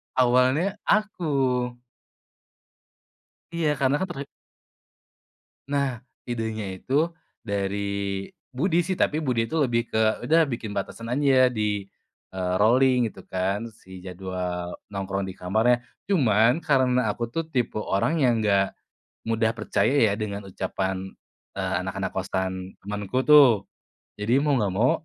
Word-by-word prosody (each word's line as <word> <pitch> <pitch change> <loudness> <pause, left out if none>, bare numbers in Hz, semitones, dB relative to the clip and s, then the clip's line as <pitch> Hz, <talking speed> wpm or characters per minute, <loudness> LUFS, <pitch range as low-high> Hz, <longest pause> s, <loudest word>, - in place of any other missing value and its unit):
Awalnya, 130 +10 +3
aku. 210 -4 +1 2.3
Iya 165 -2 +1
karena 135 +1 +3
kan 190 - -1
terj 140 -5 -5 1.5
Nah, 135 -4 -1 0.2
idenya 110 -5 -3
itu 110 +8 -7 0.5
dari 100 0 -1 0.7
Budi 165 +7 +1
sih, 185 +1 -1
tapi 150 - +2
Budi 120 -5 0
itu 160 - -4
lebih 120 -2 +1
ke, - - 0 0.3
"Udah 165 +2 +5
bikin 115 -6 -5
batasan 115 +3 -4
aja 130 0 +4
di, 105 -4 -2 0.5
eee, 90 -1 -1
rolling," 125 +3 +4
gitu 95 -3 -11
kan, 95 +4 -1
si 95 -4 -13
jadwal 90 -1 -4 0.2
nongkrong 100 0 -3
di - - -6
kamarnya 110 +7 +2 0.2
cuman, 120 - +3
karena 130 -5 +2
aku 120 - -3
tuh 165 +6 -1
tipe 125 -8 -1
orang 100 +8 0
yang 125 -3 +4
enggak 100 -2 +2 0.5
mudah 115 0 +1
percaya 115 - +1 0.2
ya - - 0
dengan 100 -2 -4
ucapan, 95 0 -3 0.5
eee, 95 -1 -1
anak-anak 95 +1 -3
kosan 95 0 -1 0.3
temenku 105 +3 -3
tuh. 130 -10 +7 0.5
Jadi 105 +3 -1
mau 150 -1 +2
nggak 100 -4 0
mau 115 +6 +3
115 Hz, 125 wpm, -25 LUFS, 95-130 Hz, 2.3 s, tuh